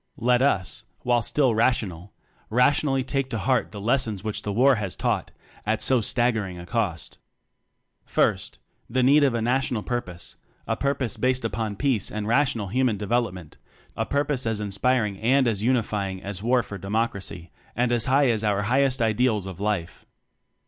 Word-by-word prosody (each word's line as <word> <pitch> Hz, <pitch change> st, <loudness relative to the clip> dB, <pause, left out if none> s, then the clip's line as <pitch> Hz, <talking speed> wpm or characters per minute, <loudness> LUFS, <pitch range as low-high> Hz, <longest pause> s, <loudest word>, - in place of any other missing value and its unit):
Let 125 Hz, -1 st, +2 dB
us 100 Hz, -9 st, +1 dB, 0.2 s
while 120 Hz, -1 st, +2 dB
still 130 Hz, +2 st, +1 dB
rational, 105 Hz, -6 st, 0 dB, 0.4 s
rationally 135 Hz, +3 st, +2 dB
take 135 Hz, 0 st, -2 dB
to 115 Hz, -, -2 dB
heart 125 Hz, +4 st, 0 dB
the 105 Hz, -, -7 dB
lessons 110 Hz, -2 st, 0 dB
which 110 Hz, -1 st, -3 dB
the 105 Hz, -, -3 dB
War 130 Hz, +4 st, +4 dB
has 100 Hz, -4 st, -3 dB
taught -, -, -1 dB, 0.3 s
at 110 Hz, +1 st, 0 dB
so 130 Hz, -3 st, +3 dB
staggering 110 Hz, -5 st, 0 dB
a 85 Hz, -, -9 dB
cost: 90 Hz, -, -3 dB, 0.8 s
First: -, -, 0 dB, 0.3 s
The 130 Hz, +2 st, +1 dB
need 145 Hz, +3 st, +5 dB
of 135 Hz, -4 st, +2 dB
a 115 Hz, -, -1 dB
National 125 Hz, -2 st, 0 dB
Purpose; 90 Hz, -8 st, -5 dB, 0.3 s
a -, -, -1 dB
purpose 140 Hz, -5 st, -1 dB
based 130 Hz, -1 st, 0 dB
upon 110 Hz, -2 st, -2 dB
peace 125 Hz, -3 st, 0 dB
and 105 Hz, 0 st, -4 dB
rational 115 Hz, -4 st, +1 dB
Human 125 Hz, -1 st, +1 dB
Development; 105 Hz, -6 st, -2 dB, 0.4 s
a -, -, -2 dB
purpose 140 Hz, -3 st, 0 dB
as 110 Hz, -2 st, -1 dB
inspiring 105 Hz, 0 st, 0 dB
and 130 Hz, +3 st, +3 dB
as 105 Hz, -4 st, 0 dB
unify 110 Hz, -4 st, 0 dB
ing 95 Hz, -1 st, -7 dB
as 100 Hz, -1 st, -4 dB
War 120 Hz, +2 st, +2 dB
for 100 Hz, -1 st, -8 dB
Democracy, 100 Hz, -3 st, -3 dB, 0.2 s
and 120 Hz, +1 st, +1 dB
as 120 Hz, -2 st, +1 dB
high 135 Hz, 0 st, +3 dB
as 110 Hz, -1 st, -1 dB
our 105 Hz, -1 st, +1 dB
highest 130 Hz, +2 st, +2 dB
Ideals 110 Hz, -2 st, +1 dB
of 95 Hz, -1 st, -8 dB
Life. 100 Hz, -5 st, -3 dB
115 Hz, 170 wpm, -25 LUFS, 100-130 Hz, 0.8 s, need